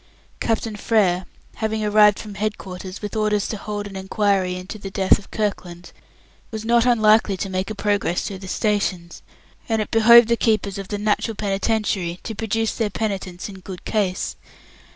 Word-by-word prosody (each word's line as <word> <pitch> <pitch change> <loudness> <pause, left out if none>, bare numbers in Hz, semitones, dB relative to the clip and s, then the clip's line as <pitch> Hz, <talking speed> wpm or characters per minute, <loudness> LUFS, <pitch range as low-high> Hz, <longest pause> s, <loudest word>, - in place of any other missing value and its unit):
Captain 225 -1 -1
Frere, 195 -4 +1 0.3
having 220 -1 -1
arrived 210 -1 +5
from 210 -2 -8
head 210 +2 -2
quarters, 185 +1 -8
with 210 - -5
orders 210 -1 +1
to - - -3
hold 205 0 -5
an 200 -1 -9
inquiry 190 -1 0
into 185 +4 -7
the 195 - -6
death 190 0 +3
of 200 - -16
Kirkland, 180 -5 -4 0.6
was 220 -1 -6
not 235 +1 +3
unlikely 215 -4 +4
to 195 +1 -4
make 185 +2 -2
a 215 - -4
progress 200 -4 0
through 195 -2 -5
the 190 - -9
stations, 190 -5 -1 0.5
and 225 -1 +1
it 215 - -3
behoved 235 +1 +7
the 235 - +4
keepers 215 -4 0
of 195 - -6
the 205 - -3
Natural 215 +2 0
Penitentiary 200 -3 -1
to 225 - -5
produce 225 +1 -1
their 225 -3 -1
Penitents 195 -4 -4
in 195 -2 -10
good 185 -1 -9
case. 195 -4 -1
205 Hz, 175 wpm, -22 LUFS, 190-220 Hz, 0.6 s, behoved